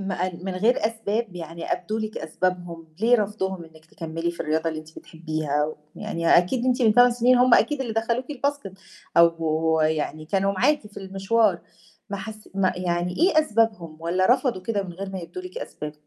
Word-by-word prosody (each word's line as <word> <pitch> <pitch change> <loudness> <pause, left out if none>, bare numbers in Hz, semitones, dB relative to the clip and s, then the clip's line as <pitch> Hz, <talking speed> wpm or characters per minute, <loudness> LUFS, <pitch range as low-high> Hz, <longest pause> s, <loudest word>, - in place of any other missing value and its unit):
ما 195 -2 -3
قال 180 -1 -4
من 190 -1 -3
غير 220 +6 +2
أسباب، 220 -2 -3
يعني 165 0 -5
أبدوا 215 +5 -2
لِك 215 0 -4
أسبابهم، 175 -1 -3
ليه 240 +2 +5
رفضُهم 190 -4 -2
إنِّك 160 -1 -18
تكمّلي 165 +1 -4
في 170 - -10
الرياضة 160 +2 0
اللي 155 -1 -4
أنتِ 155 +1 -13
بتحبّيها؟ 155 -2 -2 0.2
ويعني 170 0 -3
أكيد 235 +8 0
أنتِ 255 0 +2
من 220 -2 +4
8 245 +1 +7
سنين 245 +1 +4
هُم 250 -1 +6
أكيد 295 -2 +2
اللي 240 -4 -2
دخلوكِ 230 +3 0
الBasket 280 -6 -2 0.4
أو 165 -1 +3
يعني 155 0 -1
كانوا 195 +3 +1
معاكِ 250 +4 +2
في 205 - -18
المشوار، 195 0 +1 0.5
ما 200 - -2
حس 215 +2 -9
ما 190 -1 +2
يعني 180 0 -1
إيه 335 -2 +4
أسبابهم، 215 - 0
والّا 180 +3 +1
رفضوا 250 -8 -2
كده 205 0 -1
من 185 -2 -8
غير 190 +3 -6
ما 190 - -5
يبدوا 270 - -8
لِك 365 +6 -7
أسباب؟ 150 - -6
190 Hz, 185 wpm, -24 LUFS, 165-225 Hz, 0.5 s, 8